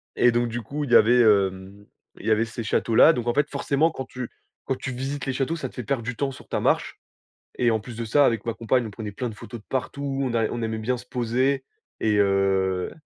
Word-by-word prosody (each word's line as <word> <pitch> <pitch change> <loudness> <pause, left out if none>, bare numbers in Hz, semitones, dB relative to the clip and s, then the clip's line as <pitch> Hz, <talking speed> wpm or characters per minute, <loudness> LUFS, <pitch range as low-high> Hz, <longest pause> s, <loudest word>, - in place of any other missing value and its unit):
Et 120 - +4
donc 120 0 +1
du 120 +1 -4
coup, 145 +7 -4
il 135 - -5
y - - +7
avait, 120 +3 +6
hem, 100 -2 +1 0.3
il - - -11
y - - +3
avait 110 +1 +3
ces 115 0 -6
châteaux 110 +1 0
là. 160 +8 +8
Donc, 120 -3 -4
en 120 - +2
fait, 145 +2 +1
forcément, 145 +3 +1
quand 130 -4 -6
tu 125 -2 -7 0.4
quand 135 - -1
tu 135 - -5
visites 135 +3 -4
les 135 - -1
châteaux, 135 +5 -1
ça 135 -5 -4
te - - -20
fait 125 - -5
perdre 115 +2 -2
du 125 +2 -4
temps 140 +3 -1
sur 130 - -13
ta - - -2
marche - - 0 0.6
et 120 -1 +3
en 110 -1 +1
plus 115 +1 -10
de 115 - -3
ça, 140 +6 +4
avec 115 -3 0
ma 115 - -1
compagne, 120 +1 0
on - - -6
prenait 105 0 -7
plein 125 +4 -3
de 110 - -8
photos 115 +2 -9
de - - -25
partout, 135 +1 -3
on 130 -3 -1
a 115 -2 +2
on 120 - -4
aimait 110 0 -2
bien 125 +4 -1
se 120 - -10
poser 130 +3 0 0.4
et 105 -1 +2
heu 95 -2 +1
120 Hz, 265 wpm, -24 LUFS, 110-130 Hz, 0.6 s, là